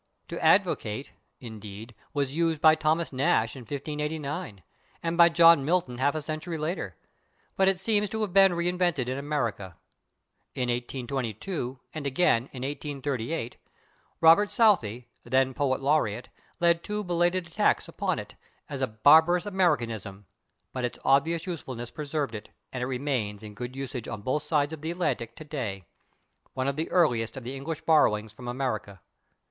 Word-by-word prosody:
/To - - -4
advocate/, 110 +6 +2 0.3
indeed, 110 -1 -9 0.2
was 140 -2 -1
used 165 -1 +1
by 155 +1 +7
Thomas 155 +1 0
Nashe 120 -4 +1
in - - -8
1589, 150 - -4 0.4
and 165 0 -1
by 170 0 +7
John 165 -3 +6
Milton 145 -6 0
half 145 +3 +2
a 155 - -3
century 155 +2 -4
later, 155 - -3 0.6
but 190 - +3
it 190 -2 +2
seems 210 +1 +1
to 220 - -3
have 205 -4 -2
been 195 -1 +6
reinvented 175 -5 0
in 130 +2 -2
America. 115 - -3 0.8
In 125 -1 -1
1822 125 - -3
and 155 -3 -4
again 130 -4 +2
in 130 -1 -7
1838 140 -2 -3 0.6
Robert 165 +6 +6
Southey, 125 - +2 0.2
then 130 +2 +2
poet 135 -1 0
laureate, 130 -6 +1 0.3
led 170 -1 +3
two 210 0 -3
belated 175 0 +1
attacks 170 - +1
upon - - -2
it, - - -7 0.3
as - - -5
a - - +2
barbarous 160 - +5
Americanism, 115 - -1 0.5
but 130 - -3
[Pg049] - - +3
its - - -11
obvious 160 +5 +3
usefulness 130 -9 -6
preserved 145 -4 -3
it, 105 -1 -7 0.2
and 125 - -3
it 125 - -1
remains 125 -6 -2
in 105 -1 -9
good 125 +4 -6
usage 135 -3 -5
on 105 -2 -6
both 130 +6 0
sides 150 -1 0
of 155 - -7
the 160 - -4
Atlantic 150 -10 -2
today 125 - -5 0.7
one 130 0 -1
of 140 - 0
the 160 +2 -3
earliest 120 -10 +2
of 130 - -6
the 130 +3 -5
English 150 +3 -5
borrowings 110 -9 +3
from 120 +2 -10
America. 120 -6 -3
140 Hz, 160 wpm, -27 LUFS, 120-165 Hz, 0.8 s, by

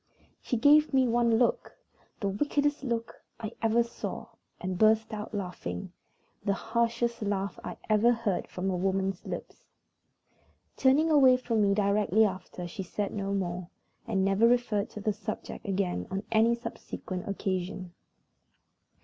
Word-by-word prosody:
She 245 - -1
gave 295 +3 +5
me 260 -1 +4
one 235 -1 +3
look 240 0 0 0.4
the 200 - 0
wickedest 290 +8 0
look 235 -3 -3 0.2
I 220 -1 -4
ever 230 +1 +3
saw, 235 - -6 0.3
and 185 -1 -3
burst 220 0 +4
out 210 0 -5
laughing 180 - -5 0.5
the 200 -1 +1
harshest 235 +1 -1
laugh 200 -1 -2
I - - -6
ever 215 +2 +4
heard 225 -5 -1
from 190 +1 -3
a - - -1
woman's 190 0 -1
lips. - - -7 1.1
Turning 290 +5 +4
away 265 -4 +7
from 230 -3 0
me 200 -1 +3
directly 210 +1 +3
after, 185 -2 -4
she 195 +4 -6
said 200 +2 -3
no 200 -1 -2
more, 180 -2 -3 0.4
and 195 -4 +1
never 195 +4 +4
referred 235 -4 +1
to - - -8
the 215 +1 0
subject 200 0 -6
again 185 - -1
on 195 +2 -3
any 230 +1 +4
subsequent 185 -5 -6
occasion. 185 -2 -3
210 Hz, 145 wpm, -29 LUFS, 195-235 Hz, 1.1 s, away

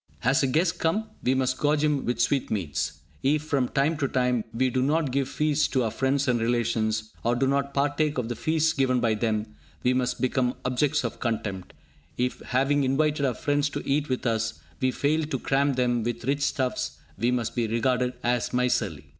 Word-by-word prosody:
Has 135 +3 +3
a 135 - +2
guest 165 +6 +1
come? 215 +7 0
We 130 +1 +2
must 130 0 0
gorge 150 0 +2
him 150 -2 +1
with 120 - -1
sweetmeats. 105 - -1 0.2
If, 150 +2 +2
from 140 -5 0
time 145 +4 +1
to 140 -2 0
time, 125 -3 +1
we 130 +2 +1
do 130 - +1
not 145 +1 +1
give 135 0 0
feasts 150 -1 +1
to 130 -2 0
our 110 - -1
friends 135 +3 0
and 120 -2 +2
relations, 110 -2 0
or 120 +1 +2
do 130 +2 +1
not 140 +1 0
partake 145 +1 +1
of 125 -3 -1
the 120 - -3
feasts 160 +3 +1
given 130 -3 +2
by 115 -2 +2
them, 110 -1 -1 0.3
we 125 - +3
must 125 -1 0
become 125 -1 +1
objects 135 +4 +1
of 120 - -4
contempt. 105 -6 -3 0.4
If, 125 +1 -1
having 135 +3 +1
invited 145 +2 +1
our 125 - -1
friends 145 -2 0
to 145 0 -6
eat 145 +1 +1
with 130 - -2
us, 115 -1 -1 0.2
we 130 - +2
fail 150 +5 +1
to 160 - -2
cram 140 +1 +1
them 125 -2 +1
with 120 +1 -3
rich 140 +2 0
stuffs, 130 -2 -1 0.2
we 120 - +2
must 120 -3 -1
be 120 -2 0
regarded 125 +2 +1
as 125 0 0
miserly. 125 0 0
130 Hz, 200 wpm, -26 LUFS, 120-145 Hz, 0.4 s, Has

